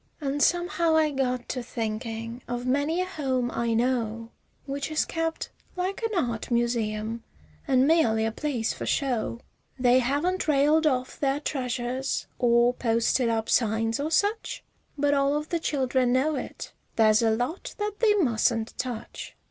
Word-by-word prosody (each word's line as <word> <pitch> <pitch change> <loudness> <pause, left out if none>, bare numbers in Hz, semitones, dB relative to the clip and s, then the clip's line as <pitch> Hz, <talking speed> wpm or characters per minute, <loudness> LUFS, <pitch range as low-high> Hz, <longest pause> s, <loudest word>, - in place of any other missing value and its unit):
An' 285 -1 -2
somehow 340 +1 +2
I 310 -1 +3
got 255 -3 -1
to 250 - -2
thinkin' 230 0 -4
of 245 0 -3
many 285 +7 +1
a - - 0
home 265 -9 -1
I 235 -1 0
know 230 -2 -1 0.3
Which 280 +1 -3
is 310 - +1
kept 325 0 -3 0.2
like 370 +3 -2
an 435 - 0
art 230 -2 -5
museum, 230 -2 -1 0.4
an' 260 -2 +4
merely 235 -9 +3
a 225 - 0
place 245 -3 -2
for - - -6
show; 245 -4 -1 0.4
They 250 0 +4
haven't 290 +10 0
railed 305 +2 +4
off 255 -3 -1
their 275 0 +1
treasures 255 -2 -2
or 240 0 +4
posted 230 +1 +1
up 225 -1 -1
signs 225 0 +1
or 295 +2 -1
such, 410 +7 0 0.3
But 285 0 +2
all 280 +1 +2
of 300 +1 -5
the 340 - 0
children 260 -5 +1
know 275 +5 +2
it 265 - -6 0.2
there's 220 -1 +5
a 225 - +3
lot 245 +10 -2
that 415 0 -3
they 430 -3 +4
mustn't 235 - +1
touch. 245 -3 -5
255 Hz, 155 wpm, -26 LUFS, 235-300 Hz, 0.4 s, there's